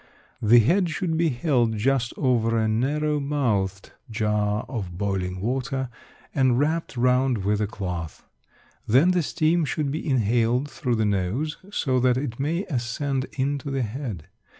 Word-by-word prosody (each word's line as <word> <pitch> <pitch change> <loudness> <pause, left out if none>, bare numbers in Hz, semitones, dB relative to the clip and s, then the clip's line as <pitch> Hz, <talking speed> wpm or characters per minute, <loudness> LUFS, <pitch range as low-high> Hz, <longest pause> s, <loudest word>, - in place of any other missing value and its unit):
The 115 +3 +6
head 170 - +4
should 165 0 -1
be 165 0 +2
held 120 -4 +1
just 125 +2 +1
over 115 -4 +2
a 110 -1 +2
narrow 145 +7 0
mouthed 110 -10 -1 0.2
jar 105 -1 0
of 95 -8 -5
boiling 95 -2 -2
water, 130 +4 -2 0.4
and 130 -3 +3
wrapped 155 0 -1
round 125 -3 +2
with 105 +1 +1
a 105 - +1
cloth. 90 -6 -5 0.6
Then 135 +11 +5
the 180 -1 +2
steam 160 +2 +1
should 145 0 -1
be 155 - -3
inhaled 120 +1 +2
through 125 -2 -2
the 110 -1 +1
nose 105 - -1
so 130 -10 0
that 125 0 +3
it 130 -3 -4
may 165 +7 0
ascend 130 -1 -2
into 140 +1 -1
the 135 -2 -1
head. 110 - -5
125 Hz, 150 wpm, -25 LUFS, 110-145 Hz, 0.6 s, The